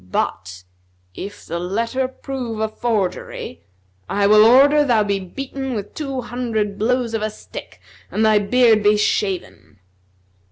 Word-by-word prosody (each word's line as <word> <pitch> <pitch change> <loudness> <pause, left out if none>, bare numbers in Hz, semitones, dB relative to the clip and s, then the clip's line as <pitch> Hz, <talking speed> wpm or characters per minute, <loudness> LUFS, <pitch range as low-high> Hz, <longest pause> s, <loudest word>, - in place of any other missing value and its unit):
But, 90 +1 -3 0.5
if 200 - -8
the 170 +1 -4
letter 230 +8 -1
prove 255 -4 -6
a 220 - +1
forgery, 210 - -3 0.5
I 200 0 +1
will 210 +1 +7
order 280 +6 +6
thou 235 -6 +3
be 200 -1 -1
beaten 265 +7 -5
with 205 -2 -5
two 275 -4 -4
hundred 225 -4 -3
blows 240 +1 0
of 225 - -1
a 215 - -1
stick 215 - -11 0.3
and 220 - +1
thy 215 -1 +5
beard 220 +1 +4
be 210 +1 +4
shaven." 190 - -2
220 Hz, 145 wpm, -20 LUFS, 200-250 Hz, 0.5 s, will